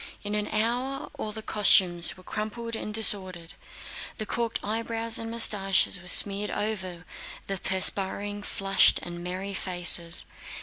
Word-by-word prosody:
In 205 0 -5
an 210 0 -1
hour, 245 +5 -3
all 215 - -5
the 220 0 -9
costumes 185 -5 +1
were 185 - -17
crumpled 225 +3 -7
and 215 - -7
disordered. 185 -6 +3 0.6
The 215 - -6
corked 230 +2 -4
eyebrows 225 +1 -4
and 225 - -7
mustaches 195 -5 +1
were 180 - -15
smeared 200 +2 +6
over 185 -5 -6 0.4
the 195 -1 -6
perspiring, 200 +2 -2
flushed, 195 -1 +1
and 175 0 -8
merry 185 +3 -6
faces. 175 -2 +4
205 Hz, 135 wpm, -25 LUFS, 185-220 Hz, 0.6 s, smeared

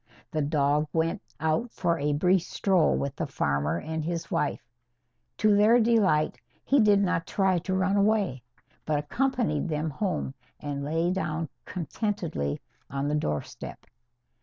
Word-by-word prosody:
The 155 - 0
dog 145 0 +2
went 165 +4 0 0.2
out 160 +10 0
for 170 -2 0
a 145 +1 +1
brief 180 +5 +3
stroll 185 0 +2
with 140 0 -2
the 165 - -3
farmer 75 - 0
and 160 0 -4
his 170 +1 -4
wife. 150 - -1 0.7
To 215 -2 +4
their 215 +4 +6
delight, 210 -10 +3 0.3
he 280 - +4
did 205 -3 +5
not 180 -3 0
try 190 -3 +2
to 185 +2 -2
run 190 +2 +2
away, 200 - +2 0.4
but 155 -1 0
accompanied 195 - 0
them 155 0 -1
home 155 -4 -2 0.3
and 145 -1 -4
lay 165 +4 0
down 165 -4 -2 0.2
contentedly 175 - -3 0.3
on 140 +1 -2
the - - 0
doorstep. 75 - -4
165 Hz, 145 wpm, -27 LUFS, 150-195 Hz, 0.7 s, their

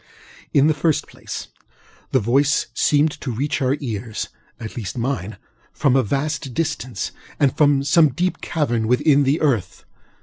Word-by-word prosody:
In 140 - +4
the 155 - +4
first 155 +1 +1
place, - - -8 0.6
the 130 - +3
voice 135 +7 +2
seemed 150 +1 +3
to 135 - -4
reach 140 +6 -2
our 130 +1 +2
earsŌĆöat 115 -6 -4 0.5
least 105 -2 -5
mineŌĆöfrom 120 +2 -2
a 135 - +5
vast 140 +2 -2
distance, 130 - -2 0.3
or 140 - +5
from 145 0 +3
some 155 +2 +5
deep 180 +8 -2
cavern 120 -8 -1
within 140 +4 +4
the 140 +4 +2
earth. 115 - 0
135 Hz, 140 wpm, -21 LUFS, 120-150 Hz, 0.6 s, a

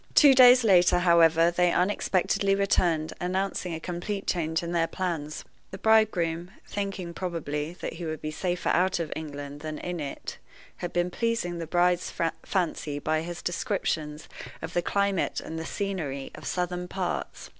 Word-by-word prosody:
Two 285 -3 +8
days 250 -1 +8
later, 180 -4 +5
however, 170 -1 +5
they 175 0 +3
unexpectedly 195 +1 +1
returned, 175 -5 +1
announcing 185 0 -1
a - - -5
complete 180 +4 -4
change 160 -1 0
in 170 - -4
their 170 -1 +2
plans. 165 -5 -4 0.2
The 190 - -7
bridegroom 185 -6 +2 0.2
(thinking, 195 -4 -4
probably, 165 -3 -3
that - - -4
he 170 +1 -6
would 155 -1 -4
be 155 - -4
safer 175 +3 -2
out 185 +2 +2
of 165 -3 -3
England 145 -2 -6
than 155 0 -5
in 180 +1 -4
it) 140 -2 -6 0.4
had 175 - -4
been 175 +1 0
pleasing 230 -6 -1
the 165 - -5
bride's 175 +1 +2 0.3
fancy 165 -6 -1
by 155 +2 0
his 175 +1 -6
descriptions 160 -6 -2 0.3
of 160 +2 -7
the 175 - +2
climate 200 0 0
and 160 0 -6
the 160 - -5
scenery 160 -10 -3
of - - -9
southern 180 0 -2
parts. 185 -1 -4
175 Hz, 160 wpm, -27 LUFS, 160-190 Hz, 0.4 s, Two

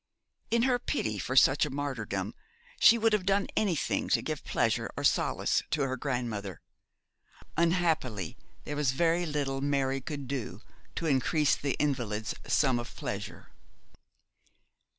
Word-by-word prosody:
In 235 +1 +2
her 250 -1 +2
pity 110 - -2
for 130 - -3
such 135 +1 +6
a 150 - 0
martyrdom 115 -8 -3 0.5
she 235 - +7
would 225 -1 +2
have 210 -3 +2
done 195 +1 +2
anything 185 -8 0
to - - +2
give - - -4
pleasure - - 0
or - - -3
solace - - +2
to 150 -2 +1
her 130 -1 -1
grandmother. 120 - -3 1.0
Unhappily 160 - +1 0.3
there 145 - -5
was 145 -3 +1
very 170 +4 +2
little 140 -3 -2
Mary 135 -1 0
could 140 0 -6
do 130 -4 -5 0.3
to 165 - -3
increase 145 +1 +2
the 140 -1 -2
invalid's 120 -7 -1
sum 130 -4 +3
of 120 - -8
pleasure. - - -6
140 Hz, 140 wpm, -30 LUFS, 125-165 Hz, 1.0 s, she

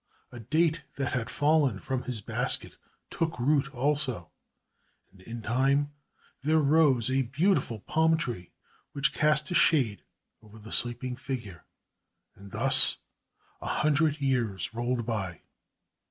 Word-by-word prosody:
A 120 - -10
date 155 +7 0
that 135 -3 -2
had 115 -3 -2
fallen 145 -7 +1
from 130 +3 -3
his 125 -5 -5
basket, - - +1 0.4
took 165 -1 -2
root 135 +2 +1
also, 130 - -2 0.8
and 95 - -20
in 115 +3 -8
time 135 +5 +1 0.5
there 155 +3 +2
rose 145 -5 +3
a 135 +1 +2
beautiful 130 - 0
palm 160 +5 +2
tree 115 - -5 0.4
which 140 -1 0
cast 150 0 +1
a - - 0
shade 130 - +3 0.4
over 110 0 -16
the 110 +1 -12
sleeping 125 +1 0
figure. 120 - -7 0.7
And 100 0 -14
thus - - +5 0.6
a - - -6
hundred 150 0 +1
years 120 -8 -1
rolled 120 0 -2
by. 95 -7 -4
130 Hz, 130 wpm, -28 LUFS, 115-150 Hz, 0.8 s, thus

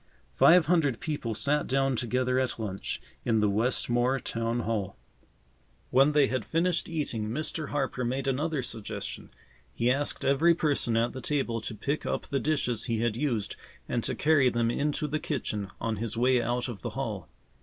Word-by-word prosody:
Five 170 -1 +6
hundred 150 -8 +2
people 145 -8 -3
sat 145 +6 +1
down 135 0 +1
together 125 +2 0
at 130 -4 -1
lunch 100 -4 -4 0.2
in 115 -2 +2
the 105 - +3
Westmore 120 +4 +1
Town 115 0 -2
Hall. 105 -4 -2 0.9
When 135 +4 +5
they 145 -1 +5
had 130 -3 -1
finished 170 - +1
eating, 125 -10 -2
Mr. 155 +4 -2
Harper 135 -3 -1
made 130 +3 -2
another 145 +1 0
suggestion. 110 -3 -5 0.4
He 120 - +1
asked 145 +2 -1
every 160 +5 +4
person 140 -8 +1
at 115 +1 +1
the 130 - -6
table 120 -4 -1
to 110 - -5
pick 140 +8 -2
up - - -1
the 140 - -1
dishes 125 -8 0
he 115 -3 -1
had 115 -2 +1
used 120 -6 -1 0.3
and 120 -2 -1
to - - -1
carry 145 -4 +4
them 120 -1 +1
into 150 +3 0
the 155 +2 -1
kitchen 105 - -3
on 115 -1 -2
his 115 +1 -3
way 125 +1 +3
out 120 +2 -1
of 120 -5 -7
the - - -3
hall. - - -4
125 Hz, 175 wpm, -28 LUFS, 115-145 Hz, 0.9 s, Five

